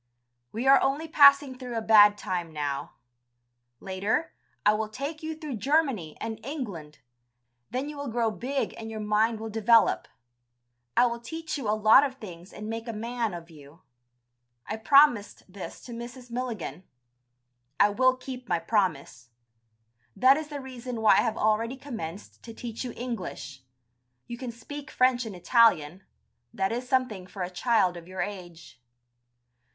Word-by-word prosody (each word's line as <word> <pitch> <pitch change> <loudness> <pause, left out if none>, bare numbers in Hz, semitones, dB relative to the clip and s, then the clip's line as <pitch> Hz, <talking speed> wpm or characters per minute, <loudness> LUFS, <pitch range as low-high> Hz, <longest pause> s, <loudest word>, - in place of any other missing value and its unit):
We 230 +4 -4
are 270 +1 +7
only 280 +4 0
passing 280 -3 +6
through 250 -3 -5
a - - -1
bad 210 -1 +7
time 175 -4 -3
now; 145 -2 -4 0.8
later, 200 +12 -2 0.3
I 210 - +6
will 215 0 -2
take 280 +7 -5
you 315 0 -4
through 300 -7 -5
Germany 260 - 0
and 220 -1 -5
England, 200 - -6 0.7
then 260 +3 -3
you 300 0 -7
will 285 0 -5
grow 230 -1 0
big 265 +5 -3
and 225 0 -7
your 220 -1 -6
mind 215 +1 +1
will 220 0 -6
develop. 225 +1 +3 0.9
I - - +6
will 235 -1 -2
teach 320 +7 -6
you 265 -8 -3
a 215 - +2
lot 215 +5 +7
of 270 -2 -2
things 180 -6 -11
and 210 0 -8
make 225 +1 -5
a 230 - -4
man 230 -2 -3
of 170 0 -10
you. 150 +2 -16 0.8
I 215 - -4
promised 245 -2 +4
this 190 0 -9
to 245 - -11
Mrs. 240 +1 -9
Milligan. 225 - -4 1.0
I 205 - +6
will 255 +5 +3
keep 255 -1 -8
my - - +2
promise. 165 - -1 0.9
That 260 +2 +6
is 310 0 -4
the 295 -1 -6
reason 250 -3 -7
why 220 - +6
I - - +5
have 220 - -1
already 225 +4 +1
commenced 215 - -8
to 230 -1 -11
teach 230 0 -6
you 250 - -5
English. 230 - -6 0.6
You 240 0 -8
can 255 -2 -5
speak 275 +5 -9
French 250 -2 +2
and 205 - -7
Italian, 180 -4 +3 0.5
that 195 +1 -1
is 245 +2 -4
something 250 -9 0
for 190 0 -6
a 180 - -5
child 195 -2 +2
of 170 -1 -10
your 185 0 -5
age." 175 -8 -8
225 Hz, 165 wpm, -27 LUFS, 195-255 Hz, 1.0 s, are